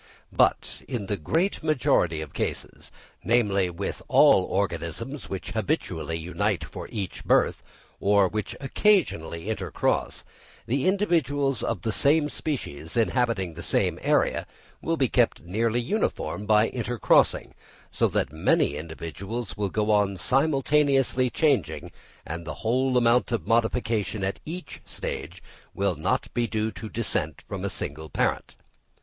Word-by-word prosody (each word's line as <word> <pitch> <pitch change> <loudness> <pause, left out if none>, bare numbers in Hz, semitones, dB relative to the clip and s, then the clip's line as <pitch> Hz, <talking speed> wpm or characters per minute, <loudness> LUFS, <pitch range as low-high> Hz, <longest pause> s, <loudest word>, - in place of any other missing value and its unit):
But - - +1
in 120 -7 -3
the 100 - -1
great 165 - 0
majority 115 - +2
of 75 - -12
cases, - - -4 0.3
namely, 100 -6 +2
with 90 +3 -5
all 95 - +6
organisms 95 - -3
which 95 - -5
habitually 90 - -2
unite 90 +2 -1
for - - -8
each 100 -5 -5
birth, - - +2 0.4
or 100 -1 +4
which 105 +2 -4
occasionally 135 - +1
intercross, 110 0 -1 0.4
the 135 +6 0
individuals 145 - +1
of - - -2
the 110 - 0
same 150 +5 +3
species 85 - -4
inhabiting 115 -6 +1
the 85 - -8
same - - +1
area - - +1 0.3
will 165 0 -1
be 135 - +3
kept 120 0 +1
nearly 110 +7 0
uniform 120 - -2
by 110 +1 +4
intercrossing; 120 -2 +2 0.4
so - - +2
that 70 - -1
many 75 -2 +2
individuals 85 +6 -6
will 100 -1 -1
go 105 +2 0
on 100 -2 +2
simultaneously 135 - +2
changing, 145 0 0 0.3
and 85 +2 -5
the 80 -2 -6
whole 130 +3 +2
amount 120 0 +3
of 115 - -1
modification 110 -3 0
at 95 +1 -2
each 170 0 -7
stage 85 +6 -6 0.3
will - - +1
not - - -1
be 120 -1 0
due 110 +1 -1
to 110 - -8
descent 80 -10 -2
from - - -5
a - - -1
single 75 +2 -6
parent. - - -1
110 Hz, 135 wpm, -26 LUFS, 90-130 Hz, 0.4 s, all